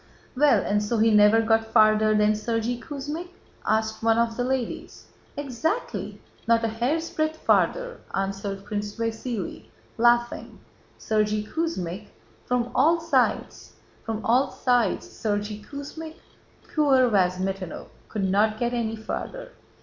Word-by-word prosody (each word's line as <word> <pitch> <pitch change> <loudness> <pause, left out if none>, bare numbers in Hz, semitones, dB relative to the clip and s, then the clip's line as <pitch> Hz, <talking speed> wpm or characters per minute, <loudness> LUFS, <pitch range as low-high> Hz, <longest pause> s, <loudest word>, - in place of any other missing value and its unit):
"Well, 260 -6 +4
and 205 +1 +1
so 210 +3 -1
he 225 +1 +4
never 210 +2 +6
got 225 0 +3
farther 215 -1 +5
than: 210 0 +4
'Sergéy 230 +2 -2
Kuzmích'?" 295 +7 -6 0.3
asked 220 0 0
one 225 0 +3
of 230 -1 +1
the 245 - -1
ladies. 255 -1 -3 0.3
"Exactly, 290 - -3 0.3
not 230 0 +3
a - - +2
hair's 265 +9 -1
breadth 310 0 -1
farther," - - +1 0.2
answered 195 0 -3
Prince 205 0 -4
Vasíli, 230 -2 -4 0.3
laughing, 240 0 +2 0.4
"'Sergéy 215 -1 0
Kuzmích... 210 - -3 0.4
From 245 -1 0
all 325 +6 +4
sides... 330 0 0 0.3
From 225 -1 -4
all 250 +4 +3
sides... 245 -6 +1
Sergéy 210 0 -3
Kuzmích...' 305 +5 -8 0.6
Poor 270 -5 +4
Vyazmítinov 185 -2 -1 0.2
could 210 -3 -3
not 210 +3 +2
get 240 +1 -1
any 225 -2 -1
farther! - - -6
225 Hz, 125 wpm, -25 LUFS, 210-265 Hz, 0.6 s, never